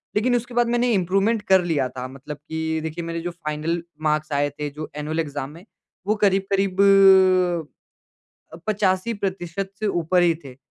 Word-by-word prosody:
लेकिन 245 +4 +2
उसके 245 +1 -3
बाद 240 0 +2
मैंने 240 +1 +1
इंप्रूवमेंट 195 +4 +1
कर 190 -3 +3
लिया 145 -6 0
था। 125 +1 -6
मतलब 135 +3 -9
कि 160 0 -2
देखिए 160 +2 -4
मेरे 165 0 -4
जो 175 +1 -4
फाइनल 165 0 -3 0.2
मार्क्स 155 0 0
आए 145 +1 +1
थे 145 +1 -5
जो 150 +2 -8
एनुअल 150 +2 -3
एग्ज़ाम 145 -3 -3
में 170 +5 -14 0.4
वो 215 - +2
करीब-करीब 195 -1 +2 1.7
अ, - - -9
85 205 +1 0
प्रतिशत 195 -1 -4
से 215 - 0
ऊपर 175 -2 +1
ही 170 -1 +4
थे। 130 -2 -11
175 Hz, 170 wpm, -23 LUFS, 150-195 Hz, 1.7 s, ही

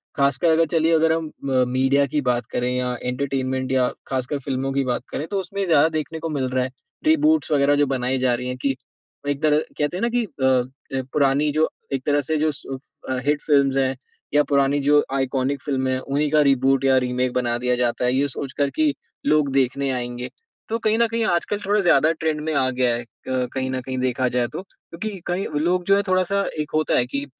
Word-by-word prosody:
ख़ासकर 140 +4 +2
अगर 165 +1 +4
चलिए 165 0 +3
अगर 160 0 +3
हम 165 -1 -2
अ, 130 -3 0
मीडिया 135 +2 +2
की 150 - +3
बात 120 0 +1
करें 125 +1 -1
या 125 0 -1
एंटरटेनमेंट 130 0 -2
या 130 -1 +3 0.2
ख़ासकर 135 +2 -2
फिल्मों 135 0 -2
की 140 0 +1
बात 120 - -2
करें 150 - -3
तो 200 +1 -2
उसमें 195 +2 -3
ज़्यादा 160 -2 +4
देखने 160 +1 -4
को 165 - -4
मिल 130 -2 -1
रहा 130 0 0
है। 130 - -4 0.3
रीबूट्स 310 - +3
वग़ैरह 145 -1 +4
जो 145 0 +3
बनाई 130 +1 0
जा 125 -1 +2
रही 125 +1 -4
है 125 - -3
कि 135 -1 +2 0.5
एक 145 0 -1
तरह 150 -1 +4 0.2
कहते 150 +4 -1
हैं - - -4
ना 235 - +1
कि 240 - +2
अ, - - -12 0.7
ज 130 - -1
पुरानी 145 +1 +2
जो 155 +2 +2 0.2
एक 135 -1 -2
तरह 145 0 +2
से 155 +3 -2
जो 155 +1 +1
स 145 - -11 0.4
अ, 130 - 0
हिट 145 0 +1
फिल्म्स 140 -2 +3
हैं। 135 0 +1 0.4
या 145 - +5
पुरानी 140 0 +2
जो 145 +1 +4
आइकॉनिक 135 0 -1
फिल्में 130 -2 -1
हैं, 130 - 0
उन्हीं 145 +3 -1
का 155 - +5
रीबूट 135 -1 +3
या 135 -1 +5
रीमेक 125 0 0
बना 120 -2 0
दिया 125 0 0
जाता 120 0 0
है। 125 - +2
ये 140 +2 +2
सोच 135 -1 -6
कर 140 -1 +1
कि 155 -2 +2 0.3
लोग 150 -1 +3
देखने 135 +1 +1
आएँगे। 125 -1 -4 0.4
तो 225 - 0
कहीं 220 -1 +1
न 235 - +4
कहीं 230 0 -1
आजकल 205 +2 0
थोड़ा 205 +2 +2
ज़्यादा 160 -3 +4
ट्रेंड 160 -1 -2
में 155 +1 -2
आ 135 -3 +2
गया 125 -2 +1
है 120 +1 -5 0.2
कहीं 130 0 -2
न 130 -1 -2
कहीं 130 +1 -5
देखा 130 0 0
जाए 120 -1 0
तो। - - -4
क्योंकि 195 +1 -8
कई 180 +3 -1 0.2
लोग 180 +1 +1
जो 195 - +5
है 200 - +3
थोड़ा-सा 185 +1 +2 0.2
एक 150 - -3
होता 155 -1 +2
है 120 - +3
कि 140 +3 -4
140 Hz, 225 wpm, -22 LUFS, 130-155 Hz, 0.7 s, या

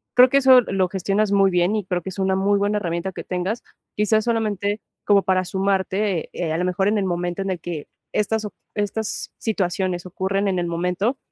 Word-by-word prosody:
Creo 250 +1 +8
que 275 - +3
eso 260 -2 +7
lo 190 -4 0
gestionas 195 +2 0
muy 195 -1 +4
bien 180 +3 +2
y 210 -4 -2
creo 180 -1 -1
que 190 - -5
es 190 - -8
una 190 0 +2
muy 200 +1 +2
buena 205 +1 +1
herramienta 170 -1 -2
que - - -7
tengas. 185 +5 -3 0.3
Quizás 210 +1 +2
solamente 210 -3 0 0.2
como 200 -1 +4
para 185 -1 +2
sumarte, 190 0 0
eh, 165 -3 -2
a - - 0
lo 180 - 0
mejor, 185 +2 +1
en 210 +1 +2
el 195 - 0
momento 175 +1 -2
en 195 - -2
el 180 - -3
que 165 -4 -6 0.3
estas 215 +1 0
o 210 - -6 0.2
estas 210 +1 -3
situaciones 185 -4 -1
ocurren 195 +2 -1
en 185 -2 0
el 175 - -1
momento, 180 +8 -1
195 Hz, 210 wpm, -22 LUFS, 180-210 Hz, 0.3 s, Creo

